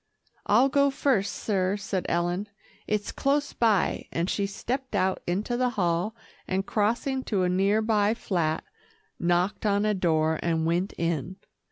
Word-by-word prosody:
"I'll 235 +6 +5
go 280 +1 +3
first, 255 -7 +1
sir," 195 -1 -1
said 195 -2 -3
Ellen, 175 +4 -1 0.4
"it's 210 -1 -1
close 285 +1 0
by," 220 -5 +1
and 170 +3 -1
she 200 -1 0
stepped 255 +5 -4
out 190 -1 +1
into 200 +7 -1
the 250 0 +2
hall, 175 +3 0 0.3
and 190 +1 -1
crossing 235 +6 0
to 195 -4 0
a 180 - +2
near 195 +4 +2
by 215 -1 +2
flat, 165 -7 -1 0.6
knocked 175 +3 +1
on 205 -1 +2
a 215 - +2
door 160 -4 +1
and 165 -1 0
went 175 +4 0
in. 170 +1 -2
200 Hz, 155 wpm, -27 LUFS, 175-220 Hz, 0.6 s, I'll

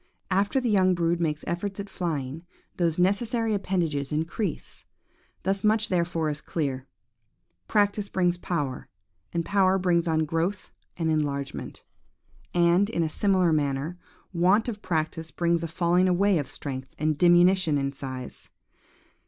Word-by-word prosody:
After 200 +7 +2
the 250 - -2
young 185 -2 +4
brood 170 0 0
make 155 -3 0
efforts 190 +4 -3
at 200 - -4
flying, 160 -5 -4 0.3
those 170 -3 +1
necessary 220 +5 +1
appendages 170 -8 -1
increase. 160 +4 -3 0.6
Thus 195 +1 0
much 215 0 +3
therefore 170 -3 0
is 150 0 -6
clear. 135 -5 -3 0.8
Practice 205 -1 +1
brings 180 -2 +1
power, 155 -7 -3 0.4
and 170 -1 -2
power 190 0 +3
brings 175 -2 +1
on 160 -1 +2
growth 165 +6 -2 0.3
and 165 -2 0
enlargement. 140 -3 -3 0.7
And, 175 +3 +3
in 170 -7 0
a 160 - -1
similar 185 -1 +2
manner, 145 +3 -1 0.3
want 185 +6 +3
of 215 -3 -4
practice 160 -2 -2
brings 170 0 0
a 165 - -2
falling 175 +2 +2
away 185 0 +3
of 145 - -3
strength 130 -2 -7
and 155 0 +1
diminution 175 -1 +4
in 140 0 -1
size. 130 -2 -8
170 Hz, 140 wpm, -26 LUFS, 155-190 Hz, 0.8 s, young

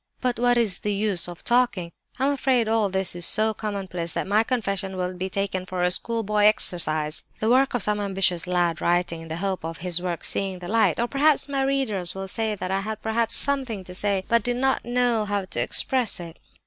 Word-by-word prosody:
"But 250 -2 -1
what 245 0 +3
is 215 -6 +2
the 205 -1 -1
use 200 -4 +2
of 175 -1 -9
talking? 240 -8 +1 0.3
I'm 270 +3 +2
afraid 260 -4 +1
all 220 -2 +2
this 190 -1 -2
is 175 - -6
so 220 +5 +2
commonplace 190 -6 -4
that - - -2
my 205 +3 +3
confession 195 -6 -2
will 180 0 -2
be 185 +1 -3
taken 195 -1 -2
for 185 -1 -3
a 180 - +2
schoolboy 210 0 0
exercise—the 155 -2 0
work 260 +1 +3
of 235 - 0
some 210 0 +1
ambitious 190 -3 +1
lad 175 -2 0
writing 175 -1 0
in 165 - -10
the 160 - -4
hope 190 -1 -2
of 165 0 -5
his 175 -1 +1
work 175 -2 -3
'seeing 195 -1 -2
the 175 -1 -8
light'; 225 +2 +2
or 235 - +1
perhaps 285 +2 +3
my 275 -1 -1
readers 255 -11 -1
will 195 0 -5
say 220 +1 -2
that 185 -1 -4
'I 195 - +1
had 215 +1 -6
perhaps 225 +1 +1
something 260 -8 +1
to 180 - -10
say, 195 0 0
but 235 0 +3
did 245 +3 -2
not 265 +1 +1
know 240 -2 +1
how 205 -1 -2
to 140 -9 -2
express 245 - +2
it. 170 -1 -9
200 Hz, 215 wpm, -24 LUFS, 180-235 Hz, 0.3 s, what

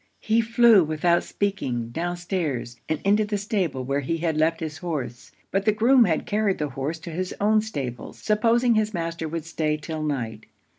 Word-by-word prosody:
He 225 +1 +2
flew 230 -3 +5
without 160 +3 +2
speaking 130 - -2
down 175 +7 -3
stairs, 150 -10 -3
and 155 - 0
into 205 +2 +3
the 205 0 -2
stable 190 - -1
where 140 +2 -1
he 155 +4 -2
had 165 -1 -1
left 160 +2 +2
his 160 -1 -5
horse; 140 -9 -5 0.2
but 195 +1 0
the 215 - +5
groom 235 +3 +5
had 160 -5 0
carried 210 -2 +1
the 150 -1 -2
horse 135 +5 -3
to 170 - -7
his 180 +3 -3
own 215 +1 +3
stables, 140 - -5
supposing 230 +3 +2
his 215 -1 +1
master 165 -1 -3
would 165 0 -4
stay 155 -2 -1
'till 155 +1 -5
night. 120 -8 -3
170 Hz, 190 wpm, -24 LUFS, 150-210 Hz, 0.2 s, flew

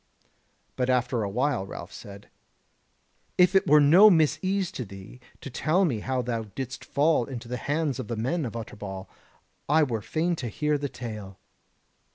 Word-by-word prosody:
But 125 0 0
after 125 -1 +1
a 100 - -2
while 125 +1 0
Ralph - - -8
said: 100 0 -11 1.1
"If 180 +1 +5
it 195 - +3
were 150 +1 +7
no 170 +9 +8
misease 180 +3 +2
to 130 - -5
thee 100 +3 -11 0.2
to 140 - -8
tell 170 +9 +2
me 125 -10 -1
how 130 +3 -2
thou 115 -2 -2
didst 135 0 -5
fall 150 -3 +2
into 120 -2 -7
the 125 +1 -3
hands 145 0 -1
of - - -5
the 115 - -3
men 150 +9 -1
of 115 -4 -5
Utterbol, 100 -4 -7 0.6
I 155 +2 +5
were 115 -6 -1
fain 170 +8 -1
to 125 - -4
hear 150 +6 -1
the 140 0 -3
tale." 105 -7 -8
130 Hz, 175 wpm, -26 LUFS, 115-155 Hz, 1.1 s, no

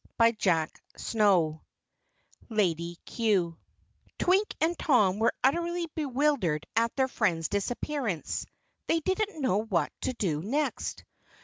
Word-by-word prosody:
CHAPTER 165 -5 +1 0.2
10 180 -8 +2 0.9
Lady 175 -6 0
Cue 195 -8 +1 0.6
Twink 385 +4 +2
and 330 +3 +2
Tom 210 -9 +3
were 225 - +2
utterly 340 +5 +1
bewildered 265 - 0
at 230 +1 +2
their 265 -1 +2
friend's 175 -10 0
disappearance. 225 - -2 0.4
They 330 - +3
didn't 380 +1 -1
know 215 -7 +2
what 185 -9 0
to - - -1
do 165 -10 -1
next. 280 - -2
225 Hz, 110 wpm, -29 LUFS, -, 0.9 s, Tom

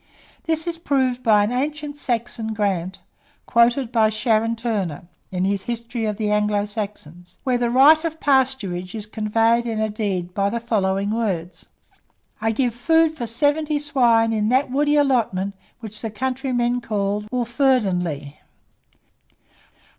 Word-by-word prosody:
This 320 0 -1
is 335 -1 -3
proved 260 -5 0
by 215 -4 +4
an 210 - -1
ancient 290 +3 -3
Saxon 235 -4 -3
grant, 190 -3 -1 0.5
quoted 235 +1 +2
by 220 -3 +3
Sharon 220 +1 +1
Turner, 205 -8 -3 0.3
in 185 0 -1
his 195 0 -1
"History 235 0 -3
of 210 -1 -2
the 210 -2 -1
Anglo 210 -1 +1
Saxons," 200 -5 -7
where 250 -2 +1
the 240 -1 +1
right 285 +6 +6
of 320 -1 -3
pasturage 255 -10 0
is 215 -2 -4
conveyed 225 +2 +1
in 225 -2 -2
a 220 0 0
deed 190 -5 -3
by 200 +1 +1
the 235 +3 -2
following 200 -3 0
words: 190 -7 -3 0.7
"I 225 +1 +1
give 240 +1 0
food 320 +6 +2
for 240 -6 -4
seventy 295 +6 +1
swine 240 -6 +2
in 215 -1 0
that 260 +2 +2
woody 295 +2 +2
allotment 230 -9 +1 0.3
which 215 -2 -8
the 225 - -3
countrymen 245 +1 -1
call 205 -2 -1
Wolferdinlegh." 215 - 0
230 Hz, 145 wpm, -22 LUFS, 205-260 Hz, 0.7 s, right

